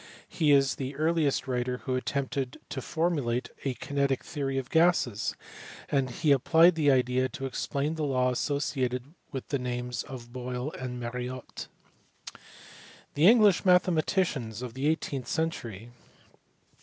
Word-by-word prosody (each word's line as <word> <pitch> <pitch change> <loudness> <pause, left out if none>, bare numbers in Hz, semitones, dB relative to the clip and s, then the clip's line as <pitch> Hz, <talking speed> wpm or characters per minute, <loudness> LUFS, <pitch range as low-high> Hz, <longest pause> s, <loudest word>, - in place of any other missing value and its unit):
He 155 -4 +1
is 135 -3 +4
the 135 +1 -4
earliest 155 -2 +1
writer 125 0 -1
who 130 - -1
attempted 135 0 -2
to 140 -3 -4
formulate 145 -7 -1
a 135 -2 -1
kinetic 140 +1 -1
theory 135 -4 -3
of 130 -1 -4
gases, 160 -10 +2 0.5
and 135 -2 +1
he 145 +5 +1
applied 160 +6 +5
the 155 -3 +2
idea 130 0 +2
to 135 - -6
explain 140 +3 -2
the 160 -1 -3
law 130 -3 +2
associated 130 0 -2 0.2
with 135 - -6
the 140 - 0
names 125 -1 -3
of 120 -2 -9
Boyle 125 +2 -4
and 125 -3 -6
Mariotte. 125 +1 -6 1.5
The 150 +5 +4
English 210 -5 +6
mathematicians 170 - +2
of 125 -2 -6
the 135 +3 -1
eighteenth 140 -5 -1
century. 120 - -3
135 Hz, 135 wpm, -28 LUFS, 125-150 Hz, 1.5 s, English